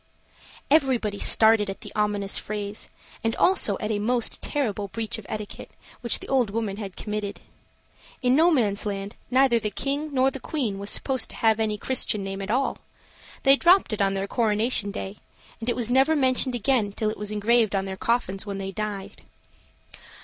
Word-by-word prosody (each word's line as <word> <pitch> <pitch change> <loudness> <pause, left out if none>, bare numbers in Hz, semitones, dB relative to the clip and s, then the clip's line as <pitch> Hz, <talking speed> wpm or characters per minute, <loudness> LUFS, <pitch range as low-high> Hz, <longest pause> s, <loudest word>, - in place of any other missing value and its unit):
Everybody 255 -9 +2
started 220 -2 +5
at 195 - -6
the - - -9
ominous 205 -2 0
phrase, 205 0 -5 0.3
and 225 0 0
also 360 - +2
at 215 - -2
a 205 - 0
most 235 +2 +1
terrible 215 -9 -2
breach 220 +2 -4
of 210 - -12
etiquette 210 -1 -6 0.3
which 235 -2 +2
the - - -10
old 255 -5 +2
woman 205 -2 -3
had 200 -3 -7
committed. 210 -1 -4 0.8
In 250 +1 +4
Nomansland, 205 - +1 0.2
neither 255 -2 +4
the 210 - -2
king 285 +8 -2
nor 265 -1 +2
the 270 - -7
queen 245 -10 -3
was 200 +1 -4
supposed 265 +3 0
to - - -10
have 220 -1 +2
any 215 -1 0
Christian 215 -3 0
name 195 0 -5
at 195 - -6
all. 260 +4 0 0.6
They 270 0 +7
dropped 350 - +4
it 210 - -2
on 195 0 +2
their 195 0 -2
coronation 215 -1 +1
day, 200 0 -6 0.4
and 230 +1 -3
it - - 0
never 265 +5 +4
was 310 - +1
mentioned 255 -1 +2
again 230 -3 +1
till 215 0 -1
it - - -8
was 210 -1 -3
engraved 215 0 +2
on 195 0 0
their 190 0 -5
coffins 195 -2 -1
when 200 -2 -5
they 195 0 -4
died. 205 -1 -5
215 Hz, 180 wpm, -25 LUFS, 200-255 Hz, 0.8 s, They